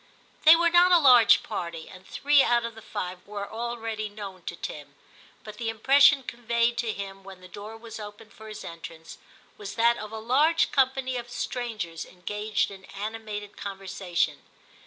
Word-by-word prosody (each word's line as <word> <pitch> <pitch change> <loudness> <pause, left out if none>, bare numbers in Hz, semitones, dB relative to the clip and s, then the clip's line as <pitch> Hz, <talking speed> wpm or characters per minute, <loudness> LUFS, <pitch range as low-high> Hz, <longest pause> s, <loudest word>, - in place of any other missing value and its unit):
They 315 +2 +10
were 340 0 +2
not 350 +1 +6
a 355 - +8
large 250 -8 +6
party, 170 -2 -5
and 185 0 -14
three 290 0 +3
out 240 -2 +2
of 230 - -5
the 225 - -12
five 180 -3 -5
were 200 -1 -5
already 225 -1 -4
known 200 -3 -9
to - - -5
Tim, 145 -3 -8 0.5
but 210 -1 -10
the 230 -2 -2
impression 270 +5 +5
conveyed 235 -1 0
to 235 -2 0
him 195 -1 -7
when 190 -1 -11
the 185 - -13
door 205 +4 -9
was 225 0 -10
opened 210 0 -10
for 220 - -13
his 215 - -8
entrance, 165 -1 -10 0.4
was 200 -1 -7
that 235 +1 +3
of 215 0 -7
a 220 - -6
large 290 +9 +2
company 265 -1 +1
of 240 0 -6
strangers 225 -9 -4
engaged 210 +3 -3
in 190 -1 -12
animated 210 0 -6
conversation. 195 -3 -3
220 Hz, 175 wpm, -26 LUFS, 195-240 Hz, 0.5 s, They